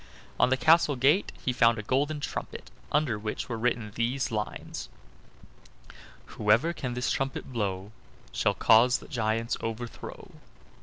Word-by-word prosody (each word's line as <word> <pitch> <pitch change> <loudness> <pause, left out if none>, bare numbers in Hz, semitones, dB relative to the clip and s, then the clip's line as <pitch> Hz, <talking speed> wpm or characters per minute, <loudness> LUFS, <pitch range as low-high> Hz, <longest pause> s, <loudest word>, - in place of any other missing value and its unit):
On - - +5
the 130 - +2
castle 160 -1 +4
gate 140 +10 +3
he 125 - +1
found 115 -1 +4
a 110 - -5
golden 145 +6 0
trumpet, - - -6 0.2
under 140 -8 +1
which 110 0 -4
were 120 - -3
written 115 -2 -1
these 125 +3 -1
lines: 105 -1 -5 1.4
"Whoever 110 - +2
can 130 -7 -4
this 125 -1 -1
trumpet 135 -1 -3
blow 100 -3 -2 0.4
Shall - - +1
cause 125 +3 +5
the - - -13
giant's 115 -2 -1
overthrow." 115 +1 -6
120 Hz, 140 wpm, -28 LUFS, 110-135 Hz, 1.4 s, On